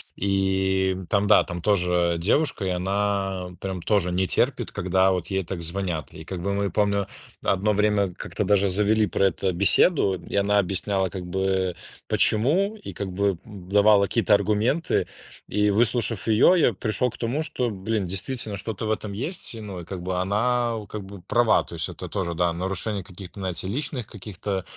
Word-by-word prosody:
И, 95 Hz, -1 st, +1 dB
м, 95 Hz, -2 st, -8 dB
там, 100 Hz, 0 st, +1 dB
да, 105 Hz, -, +6 dB
там 90 Hz, -1 st, -6 dB
тоже 90 Hz, -3 st, +2 dB
девушка, 110 Hz, -, +1 dB
и 95 Hz, -, 0 dB
она 95 Hz, 0 st, -1 dB
прям 95 Hz, -2 st, -4 dB
тоже 90 Hz, -4 st, +1 dB
не 95 Hz, 0 st, +1 dB
терпит, -, -, 0 dB
когда 95 Hz, +1 st, +2 dB
вот 90 Hz, -2 st, -2 dB
ей 95 Hz, -1 st, -1 dB
так 85 Hz, 0 st, -5 dB
звонят. 85 Hz, -4 st, -3 dB
И 80 Hz, -, -9 dB
как 90 Hz, +1 st, -6 dB
бы 100 Hz, +2 st, -1 dB
мы, 100 Hz, -1 st, -1 dB
помню, 100 Hz, 0 st, +1 dB, 0.4 s
одно 100 Hz, +2 st, +2 dB
время 105 Hz, -2 st, +2 dB
как-то 105 Hz, +2 st, -4 dB
даже 100 Hz, 0 st, +3 dB
завели 105 Hz, +3 st, +3 dB
про 100 Hz, +1 st, +1 dB
это 95 Hz, 0 st, +1 dB
беседу, 100 Hz, -, +3 dB
и 90 Hz, +2 st, -5 dB
она 100 Hz, +1 st, +3 dB
объясняла 95 Hz, 0 st, 0 dB
как 90 Hz, -1 st, -6 dB
бы, 95 Hz, 0 st, 0 dB, 0.3 s
почему, 180 Hz, -, +2 dB
и 205 Hz, -, -9 dB
как 100 Hz, -2 st, -4 dB
бы, 100 Hz, 0 st, 0 dB
м, 100 Hz, -5 st, -11 dB
давала 100 Hz, +1 st, +5 dB
какие-то 110 Hz, 0 st, +3 dB
аргументы. 105 Hz, -, +1 dB, 0.4 s
И, 105 Hz, 0 st, +2 dB
выслушав 115 Hz, -2 st, +1 dB
ее, 110 Hz, +11 st, +6 dB
я 135 Hz, -9 st, +4 dB
пришел 110 Hz, +6 st, -1 dB
к -, -, -12 dB
тому, 125 Hz, +6 st, -1 dB
что, 125 Hz, -5 st, -2 dB
блин, 105 Hz, 0 st, -2 dB
действительно 100 Hz, +4 st, -4 dB
что-то 110 Hz, +2 st, -4 dB
в 110 Hz, -, 0 dB
этом 105 Hz, -1 st, -3 dB
есть, 130 Hz, -, -4 dB
ну, 105 Hz, -6 st, -7 dB
и -, -, -9 dB
как 95 Hz, 0 st, -6 dB
бы 90 Hz, 0 st, -1 dB
она, 115 Hz, +4 st, +1 dB
у 105 Hz, -2 st, -8 dB
как 105 Hz, -2 st, -6 dB
бы 95 Hz, -1 st, -11 dB
права. 120 Hz, -2 st, +3 dB
То -, -, -12 dB
есть 80 Hz, -, -3 dB
это -, -, -7 dB
тоже, 85 Hz, -4 st, -3 dB
да, 85 Hz, 0 st, +1 dB
нарушение 95 Hz, +3 st, -3 dB
каких-то, 95 Hz, +1 st, -10 dB
знаете, 95 Hz, -1 st, -3 dB
личных 125 Hz, +1 st, -3 dB
каких-то, 100 Hz, -1 st, -5 dB
100 Hz, 185 wpm, -25 LUFS, 95-105 Hz, 0.4 s, да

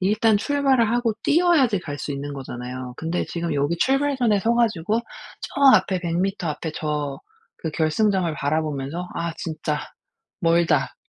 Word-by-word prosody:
일단 210 Hz, +3 st, +3 dB
출발을 270 Hz, -2 st, +2 dB
하고 240 Hz, -1 st, +1 dB
뛰어야지 305 Hz, -, +3 dB
갈 145 Hz, -5 st, -6 dB
수 145 Hz, -, -5 dB
있는 140 Hz, +1 st, -4 dB
거잖아요. 125 Hz, -1 st, -6 dB
근데 165 Hz, +2 st, -2 dB
지금 170 Hz, -1 st, -3 dB
여기 145 Hz, +4 st, 0 dB
출발선에 265 Hz, -5 st, +2 dB
서 230 Hz, +4 st, +2 dB
가지고 220 Hz, -3 st, +1 dB, 0.4 s
저 -, -, -6 dB, 0.2 s
앞에 185 Hz, -2 st, 0 dB
100 170 Hz, -1 st, -2 dB
미터 195 Hz, -2 st, -1 dB
앞에 155 Hz, +1 st, -4 dB
저 150 Hz, -2 st, -2 dB, 0.5 s
그 160 Hz, -, -1 dB
결승점을 170 Hz, +2 st, +1 dB
바라보면서 150 Hz, +3 st, -2 dB
'아 170 Hz, 0 st, -2 dB
진짜 155 Hz, -2 st, -3 dB, 0.6 s
멀다. 165 Hz, -5 st, +2 dB
170 Hz, 305 characters per minute, -23 LUFS, 150-220 Hz, 0.6 s, 일단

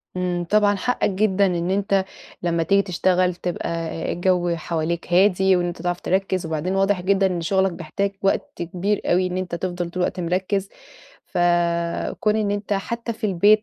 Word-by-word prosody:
إمم، 180 Hz, -1 st, -1 dB
طبعًا 210 Hz, -1 st, +4 dB
حقك 245 Hz, +3 st, 0 dB
جدًا 200 Hz, 0 st, +2 dB
إن 175 Hz, 0 st, 0 dB
أنت 195 Hz, -1 st, +1 dB, 0.4 s
لمّا 170 Hz, -1 st, +1 dB
تيجي 200 Hz, +3 st, +3 dB
تشتغل 180 Hz, -1 st, +1 dB
تبقى 175 Hz, 0 st, -3 dB
آآ 165 Hz, -1 st, -3 dB
الجَو 175 Hz, -1 st, +1 dB
حواليك 170 Hz, +1 st, -3 dB
هادي 190 Hz, 0 st, +4 dB
وإن 175 Hz, 0 st, +1 dB
أنت 170 Hz, -1 st, -6 dB
تعرف 175 Hz, 0 st, -2 dB
تركِّز 190 Hz, -1 st, 0 dB
وبعدين 160 Hz, +4 st, -2 dB
واضح 195 Hz, -1 st, +2 dB
جدًا 195 Hz, +1 st, +2 dB
إن 175 Hz, -2 st, -2 dB
شُغلك 190 Hz, +2 st, +2 dB
بيحتاج 170 Hz, +5 st, -3 dB
وقت 195 Hz, -, 0 dB
كبير 185 Hz, +4 st, -1 dB
أوي 185 Hz, +1 st, +2 dB
إن 180 Hz, 0 st, -3 dB
أنت 180 Hz, -2 st, -3 dB
تفضل 175 Hz, -1 st, -3 dB
طول 180 Hz, +1 st, -2 dB
الوقت 180 Hz, -, -2 dB
مركِّز. 185 Hz, +3 st, -1 dB, 0.6 s
فكٌون 175 Hz, +4 st, +1 dB
إن 210 Hz, -2 st, 0 dB
أنت 205 Hz, 0 st, -2 dB
حتّى 230 Hz, +4 st, -2 dB
في 220 Hz, -, -8 dB
البيت 205 Hz, +3 st, +4 dB
185 Hz, 170 wpm, -22 LUFS, 175-195 Hz, 0.6 s, طبعًا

